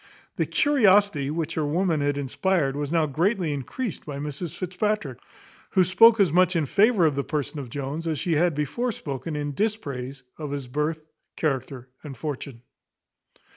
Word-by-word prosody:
The - - 0
curiosity 205 - +3
which 160 +1 -2
her 155 - -1
woman 160 +1 +1
had 145 0 0
inspired 145 +1 0
was 145 0 -3
now 165 -2 +3
greatly 170 - 0
increased 170 - -4
by 145 -2 -6
Mrs 150 +3 -5
Fitzpatrick, 185 - -2 0.5
who 185 - +5
spoke 220 +6 +6
as 185 -6 +4
much 185 0 +4
in 160 -3 +2
favour 205 - +4
of 155 - +3
the 140 0 -1
person 150 0 -3
of 130 -4 -7
Jones 145 +5 -4
as 160 -2 -1
she 170 +4 -1
had 165 +1 +2
before 150 - -1
spoken 150 - -5
in 145 -1 -3
dispraise 140 - -3 0.2
of 150 -2 -4
his 140 -2 -4
birth, 150 +4 -2 0.3
character, 135 -4 -2 0.2
and 140 -4 -8
fortune. 135 -3 -6
155 Hz, 170 wpm, -25 LUFS, 140-185 Hz, 0.5 s, spoke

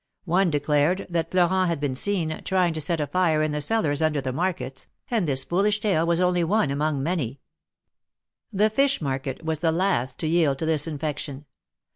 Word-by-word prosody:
One 180 +2 +2
declared 150 +4 +1
that 165 -1 -1
Florent 185 +1 +2
had 165 -3 -1
been 145 -2 -1
seen, 160 +1 -1
trying 185 -3 +1
to 160 - -3
set 165 +2 -1
a 150 - 0
fire 160 -2 +1
in 155 - 0
the 150 0 -2
cellars 150 -4 +1
under 155 -2 +1
the 130 -2 -3
markets, 135 -5 -3 0.2
and 220 -8 +1
this 135 -2 0
foolish 205 +4 +1
tale 185 -6 +1
was 170 0 +2
only 180 -1 +2
one 170 -4 +1
among 145 -1 -1
many. 140 -6 -2 1.1
The 210 +2 +2
fish 275 +4 +2
market 135 0 -4
was 160 -2 -1
the 165 -1 +2
last 165 -8 0
to 160 - -1
yield 155 -4 +2
to 160 - -3
this 160 -1 0
infection. 150 -2 -5
160 Hz, 190 wpm, -24 LUFS, 145-185 Hz, 1.1 s, One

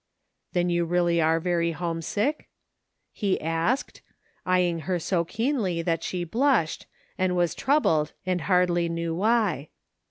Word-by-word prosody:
" - - -51
Then 175 0 +1
you 175 0 +2
really 170 0 +2
are 160 +1 +3
very 170 -1 0
homesick? 175 - -2 0.3
" - - -54 0.3
he 200 -4 -1
asked, 165 - -1 0.5
eying 180 -2 +2
her 185 -1 0
so 170 +1 0
keenly 215 - -1
that 165 -1 0
she 180 +1 -3
blushed, 225 - +1 0.3
and 185 -1 +1
was 175 -3 +1
troubled, 215 - +2
she 185 0 +1
hardly 180 -2 +2
knew 165 0 -2
why. 195 - +1
175 Hz, 145 wpm, -26 LUFS, 165-190 Hz, 0.5 s, are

